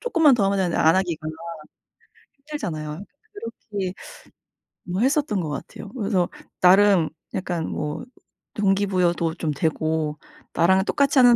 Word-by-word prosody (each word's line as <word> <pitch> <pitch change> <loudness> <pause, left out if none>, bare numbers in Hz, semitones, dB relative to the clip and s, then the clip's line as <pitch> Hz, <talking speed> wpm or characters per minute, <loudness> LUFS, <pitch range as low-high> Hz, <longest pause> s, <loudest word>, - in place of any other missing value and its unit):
쪼끔만 330 - +4
더 205 - +2
하면 195 0 +1
되는데 180 -3 0
안 160 +1 +5
하기가 175 -5 -1 1.1
힘들잖아요. 180 - -5 0.7
그렇게 195 -3 -2 0.9
뭐 180 +2 -2
했었던 265 -6 +2
것 160 - -3
같아요. 150 +7 -7
그래서 195 -7 0 0.3
나름 185 -2 +6 0.2
약간 175 -3 -2
뭐 150 +9 -4 0.5
동기부여도 190 -5 +1
좀 160 -4 -2
되고 155 0 -1 0.4
나랑 190 +3 +4
똑같이 280 +2 +3
하는 245 -1 +8
190 Hz, 275 characters per minute, -24 LUFS, 160-210 Hz, 1.1 s, 하는